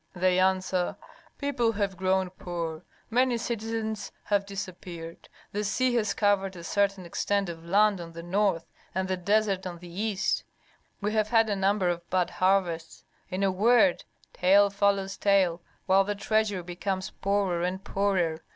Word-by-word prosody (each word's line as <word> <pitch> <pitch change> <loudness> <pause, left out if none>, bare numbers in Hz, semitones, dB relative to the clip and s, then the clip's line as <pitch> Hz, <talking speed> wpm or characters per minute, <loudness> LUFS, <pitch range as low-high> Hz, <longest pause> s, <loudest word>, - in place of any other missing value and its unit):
They 185 0 +2
answer: 185 -1 +1 0.4
people 250 -6 0
have 200 -2 -1
grown 185 0 +1
poor, 170 -3 -5 0.3
many 250 +1 +3
citizens 225 -2 -3
have 200 -1 0
disappeared, 175 -4 -7 0.2
the 210 +1 -2
sea 250 +5 +1
has 215 -4 +1
covered 195 -2 +1
a 170 - -9
certain 195 +1 0
extent 200 +2 -1
of 165 -1 -8
land 200 +2 +3
on 165 -1 -9
the 170 0 -8
north, 185 -1 +1 0.3
and 190 0 0
the 185 - 0
desert 195 +1 +1
on 175 -1 -6
the 175 0 -12
east, 210 -3 0 0.6
we 210 +1 -1
have 215 -1 +2
had 225 -1 +3
a - - +1
number 195 0 +1
of 175 -1 -2
bad 185 -1 +1
harvests; 180 -3 0 0.3
in 185 +2 -2
a 195 - +3
word, 215 -1 +4 0.3
tale 200 +2 +4
follows 200 -1 +1
tale 190 -4 +2 0.2
while 195 +1 +5
the 205 +1 -2
treasury 205 -2 0
becomes 185 +2 -3
poorer 195 -3 0
and 185 +2 -2
poorer. 185 -6 0
195 Hz, 160 wpm, -28 LUFS, 180-205 Hz, 0.6 s, while